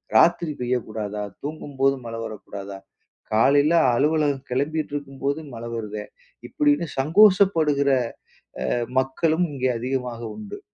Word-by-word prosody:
ராத்திரி 165 +6 +4
பெய்யக்கூடாதா? 110 -4 -2 0.2
தூங்கும்போது 140 -2 -1
மழை 115 0 -5
வரக்கூடாதா? 100 -2 -7 0.5
காலையில 140 +8 +4 0.2
அலுவலகம் 145 0 +1
கெளம்பிட்டுருக்கும்போது 140 0 -2
மழை 115 0 -6
வருதே." 105 -2 -5 0.4
இப்படின்னு 145 +3 +1
சங்கோஷப்படுகிற, 160 -3 +4 0.8
அ - - +1 0.3
மக்களும் 160 +6 +1
இங்கே 130 -2 0
அதிகமாக 125 -1 -3
உண்டு. 105 -1 -8
135 Hz, 95 wpm, -24 LUFS, 115-150 Hz, 0.8 s, ராத்திரி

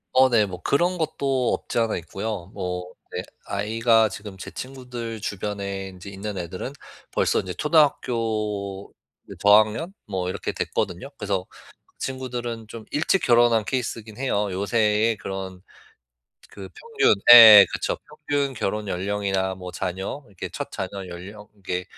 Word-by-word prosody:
어, 130 0 +6
네. 115 -4 +4
뭐 90 -3 -8
그런 175 - +1
것도 140 -6 0
없지 - - -4
않아 115 -2 +1
있고요. 95 +2 -5
뭐 90 -2 -4 0.2
네. - - -2 0.2
아이가 110 +2 +2
지금 105 -2 -9
제 - - -8
친구들 125 -4 -7
주변에 100 -1 -4
인제 95 +1 -11
있는 100 +1 -6
애들은 90 +9 -5 0.4
벌써 - - +1
인제 90 -1 -4
초등학교 110 - 0 0.3
네, - - -11
저학년? 110 - +4
뭐 95 -3 -2
이렇게 - - -3
됐거든요. 95 +11 -3
그래서 100 -3 -2 0.5
친구들은 120 -4 -5
좀 115 -1 -9
일찍 160 +6 +2
결혼한 120 -2 +4
케이스이긴 115 -3 -4
해요. 105 -6 0
요새에 105 +3 +1
그런 95 -1 -6 0.9
그 95 -2 -9
평균 455 - +2 0.2
예, - - +14 0.3
예. - - +2
그쵸. - - -1 0.3
평균 140 -2 0
결혼 105 -1 -2
연령이나 95 0 -1
뭐 90 -1 -8
자녀, 95 +9 -4
이렇게 100 -3 -7
첫 - - -5
자녀 95 0 -5
연령 100 +4 -10
이렇게 90 -3 -4
105 Hz, 300 characters per minute, -24 LUFS, 95-120 Hz, 0.9 s, 예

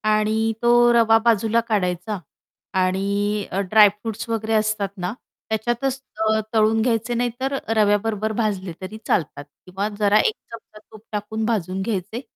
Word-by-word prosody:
आणि 220 +1 +1
तो 240 0 +4 0.2
रवा 225 -1 +5
बाजूला 230 0 +3
काढायचा 185 -1 -1 0.5
आणि 200 +2 0
अ, 195 - -1
ड्रायफ्रुट्स 215 +3 +2
वगैरे 225 0 -1
असतात 215 -2 +1
ना, 180 +3 -3 0.4
त्याच्यातच 240 +5 -1 0.2
अ, 220 0 +2
तळून 220 0 +3
घ्यायचे 230 0 0
नाहीतर 245 +3 -2 0.2
रव्याबरोबर 215 0 +1
भाजले 195 -5 -1
तरी 195 +4 -7
चालतात 150 -4 -1 0.2
किंवा 190 +3 -3
जरा 205 0 +4
1 435 - +2 0.2
चमचा 225 -2 -12
तूप 215 -1 -13
टाकून 215 +1 -3
भाजून 190 -4 -1
घ्यायचे, 210 +3 -3
215 Hz, 135 wpm, -22 LUFS, 200-225 Hz, 0.5 s, रवा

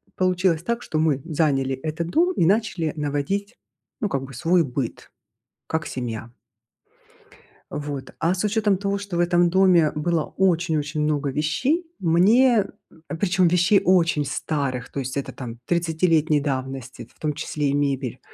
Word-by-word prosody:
получилось 185 -3 +1
так, 235 +4 -2
что 155 - -3
мы 150 -4 +1
заняли 140 -5 +1
этот 155 +4 -4
дом 350 - +2
и 170 - +2
начали 190 -5 +1
наводить, 150 - -2 0.4
ну, 210 - 0
как 135 -5 -2
бы 135 +1 -10
свой 165 +8 +2
быт, 130 -3 -5 0.6
как 160 +1 -2
семья. 115 -2 -5 1.4
Вот. 145 -2 -5
А 170 +2 +2
с 185 - -2
учетом 210 -2 +2
того, 200 +1 -1
что 200 -3 -5
в - - 0
этом 175 0 +3
доме 180 -4 +4
было 160 +1 0
очень-очень 160 -5 +1
много 150 -1 0
вещей, 250 - 0
мне 205 +7 +4 0.4
а, - - -3
причем, 180 +1 +2
вещей 180 +3 +4
очень 170 -4 +3
старых, 135 -3 -3
то 140 - -4
есть 130 +1 -4
это, 140 - -4
там, 120 -3 -8
тридцатилетней 165 -2 +2
давности, 130 -4 -4
в - - -32
том 150 -1 -1
числе 145 0 -2
и - - 0
мебель, 140 -4 -1
160 Hz, 155 wpm, -23 LUFS, 140-185 Hz, 1.4 s, доме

